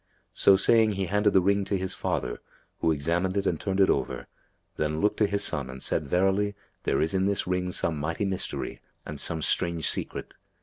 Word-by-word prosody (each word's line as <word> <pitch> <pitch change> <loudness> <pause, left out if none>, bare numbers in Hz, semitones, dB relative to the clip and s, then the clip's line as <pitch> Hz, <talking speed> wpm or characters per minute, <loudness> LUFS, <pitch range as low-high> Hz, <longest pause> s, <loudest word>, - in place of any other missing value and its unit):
So 100 - +5
saying 110 +2 +4
he 95 -1 -2
handed 105 +3 +2
the 95 - +5
ring 100 +1 +2
to 95 0 0
his 95 0 -2
father, - - -2 0.4
who 80 - +2
examined 85 +6 0
it 100 - 0
and 80 - 0
turned 95 -1 -1
it 95 - +6
over, - - -2 0.5
then 75 0 -1
looked 105 - +1
to 105 - +3
his 100 0 -1
son 70 -3 0
and 65 +1 -8
said, 75 +2 -1
"Verily, 95 +4 +1 0.3
there - - +1
is 80 - -1
in 95 0 +1
this 100 -2 0
ring 90 0 -1
some 80 -3 -1
mighty 85 +6 -2
mystery 95 -1 -3 0.2
and 75 -2 -6
some 80 +1 -2
strange 85 -2 0
secret. - - -1
95 Hz, 205 wpm, -27 LUFS, 80-100 Hz, 0.5 s, it